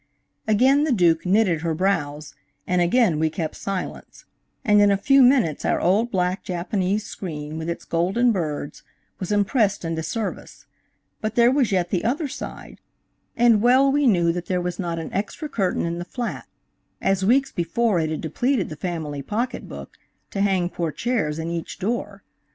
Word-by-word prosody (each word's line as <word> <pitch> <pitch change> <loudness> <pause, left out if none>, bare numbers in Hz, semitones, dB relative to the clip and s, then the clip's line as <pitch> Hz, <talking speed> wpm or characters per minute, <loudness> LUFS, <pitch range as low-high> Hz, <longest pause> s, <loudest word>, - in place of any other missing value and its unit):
Again 260 +7 +4
the 310 - +1
Duke 175 -6 +3
knitted 185 -4 +3
her 165 -1 -1
brows, 155 -5 -1 0.3
and 180 0 +1
again 175 -2 +3
we 160 0 +2
kept 160 -1 -4
silence, 195 -2 -6 0.4
and 210 -1 +5
in 205 - +5
a 200 - +3
few 275 +7 +4
minutes 245 - +3
our - - +1
old 205 +7 +2
black 185 -2 -1
Japanese 190 +3 -1
screen, 155 -4 -6
with 160 +1 -4
its 170 - -5
golden 190 +9 +2
birds, 155 -7 -3 0.4
was 185 +1 -4
impressed 205 -1 +1
into 165 -1 -2
service; 200 +7 -5 0.6
but 215 0 -3
there 240 0 +5
was 265 -5 +2
yet 180 -2 0
the 180 - 0
other 285 +6 0
side, 270 - -8 0.6
and 235 -3 +5
well 260 +4 +5
we 285 0 +2
knew 175 -6 +3
that 175 0 -5
there 180 -1 0
was 180 0 -4
not 170 -3 -2
an 165 - -6
extra 210 - -3
curtain 195 -13 -1
in 170 +1 -3
the - - -3
flat, 240 +6 -5 0.5
as 195 -1 +1
weeks 265 +7 +3
before 205 +3 0
it 160 -1 0
had 155 - -3
depleted 230 - 0
the 155 - -6
family 155 -3 -4
pocket 220 - -3
book - - -10 0.3
to 195 - -2
hang 190 -3 +2
portières 170 - -2
in 165 +1 -3
each 170 -1 -5
door. 205 -1 -3
190 Hz, 175 wpm, -23 LUFS, 170-230 Hz, 0.6 s, and